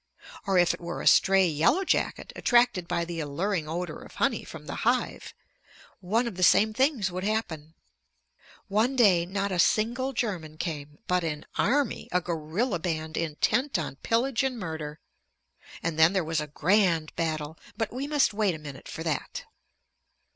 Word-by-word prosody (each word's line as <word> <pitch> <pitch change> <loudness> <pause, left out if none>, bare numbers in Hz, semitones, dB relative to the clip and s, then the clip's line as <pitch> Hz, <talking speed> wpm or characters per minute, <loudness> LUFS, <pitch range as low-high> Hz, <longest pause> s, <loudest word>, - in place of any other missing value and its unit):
Or 195 -1 +2
if 175 -1 +4
it - - -9
were 170 0 -5
a - - -7
stray 195 0 +5
yellow 165 - +2
jacket - - -1
attracted 240 -8 +3
by 170 - -1
the 170 -1 -5
alluring 160 +3 -2
odor 175 +2 -4
of - - -13
honey - - 0
from - - -10
the - - -6
hive, - - -1 0.6
one 215 +6 0
of 225 -6 -5
the - - -4
same 215 +4 +5
things 255 - +1
would 185 +1 -4
happen. 165 -8 -3 0.9
One 220 +6 +1
day 185 -9 +4
not 200 +1 -2
a 180 - -1
single 235 - +2
German 180 -10 -3
came, 150 -3 -5
but 180 -1 +1
an 150 -2 -3
army, 275 -1 0
a 180 - +3
guerrilla 175 +5 -2
band 160 -2 -3
intent 210 - 0
on 150 -4 -4
pillage 235 - 0
and 265 -2 -1
murder. 160 -5 -5 0.8
And 165 -1 -2
then 160 +3 +6
there 190 -3 +1
was 160 -1 -1
a 150 - -5
grand 165 0 +1
battle 160 -1 -3 0.2
but 225 -1 -2
we 265 +3 -3
must 290 -6 +2
wait 205 -4 +1
a - - -6
minute 145 -3 -10
for 160 - -6
that. 155 -4 -3
180 Hz, 170 wpm, -27 LUFS, 160-220 Hz, 0.9 s, then